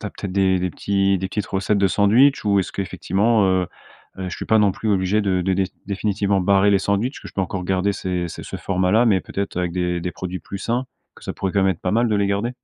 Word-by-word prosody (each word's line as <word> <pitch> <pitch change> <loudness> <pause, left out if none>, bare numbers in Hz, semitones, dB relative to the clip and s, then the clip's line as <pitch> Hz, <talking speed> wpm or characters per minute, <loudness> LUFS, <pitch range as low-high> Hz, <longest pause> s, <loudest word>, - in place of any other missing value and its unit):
tu - - -10
as - - -5
peut-être 100 - -6
des 95 -1 +2
des 90 +1 -1
petits 100 +1 +1
des 95 +1 -3
petites 100 0 -3
recettes 100 +1 0
de 100 - +3
sandwichs? 115 +9 +4
Ou 100 -1 +3
est-ce 95 - -2
qu'effectivement, 100 +3 +1
heu 95 -1 +1 0.5
heu, 95 -1 -4
je 90 - -5
suis - - -5
pas 110 - +4
non 105 -2 +4
plus 110 +3 -3
obligé 95 +1 +2
de 95 -3 0
de 95 +2 0
déf 95 0 0 0.2
définitivement 100 0 0
barrer 100 +2 +4
les 100 - +3
sandwichs, 100 +7 0
est-ce - - -10
que - - -8
je - - -17
peux - - -1
encore 95 0 -3
garder 95 +2 +1
ces 90 -2 -3
ces - - -8
ce - - -6
format-là 95 +5 +2
mais 100 -5 +3
peut - - -13
être, 100 -2 -2
avec 90 -1 -1
des 90 -1 -1
des 90 - -3
produits 90 +2 -5
plus 100 - -7
sains? 120 +5 -2 0.3
Que - - -18
ça - - -3
pourrait, 95 -1 -3
quand 100 - +2
même, 95 - +3
être 85 - -14
pas 90 - -1
mal 115 +2 +2
de 105 - +1
les 100 0 +1
garder? 100 +4 -1
100 Hz, 280 wpm, -21 LUFS, 95-100 Hz, 0.5 s, sandwichs